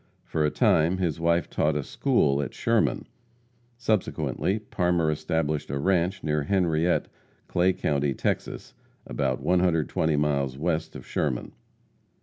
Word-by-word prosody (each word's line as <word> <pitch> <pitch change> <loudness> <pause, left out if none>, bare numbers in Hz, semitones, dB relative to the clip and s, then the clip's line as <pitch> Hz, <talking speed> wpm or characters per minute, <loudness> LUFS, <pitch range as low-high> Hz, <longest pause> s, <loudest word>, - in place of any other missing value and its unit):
For 80 - -1
a 75 - +3
time, 80 +4 +3
his 85 -4 -1
wife 85 +1 +2
taught 75 0 0
a 75 - -1
school 70 +1 +1
at 70 - -5
Sherman. - - +1 0.7
Subsequently, 110 -3 0
Parmer 90 -6 0
established 75 -1 -1
a 70 - -2
ranche 90 +4 +1
near 75 -1 0
Henriette, 85 0 +1 0.4
Clay 90 +2 +2
county, 70 -5 0
Texas, - - -3 0.3
about 65 -3 -1
120 80 -3 +2
miles 70 -3 0
west 80 +1 -2
of - - -9
Sherman. - - -2
80 Hz, 130 wpm, -26 LUFS, 75-90 Hz, 0.7 s, a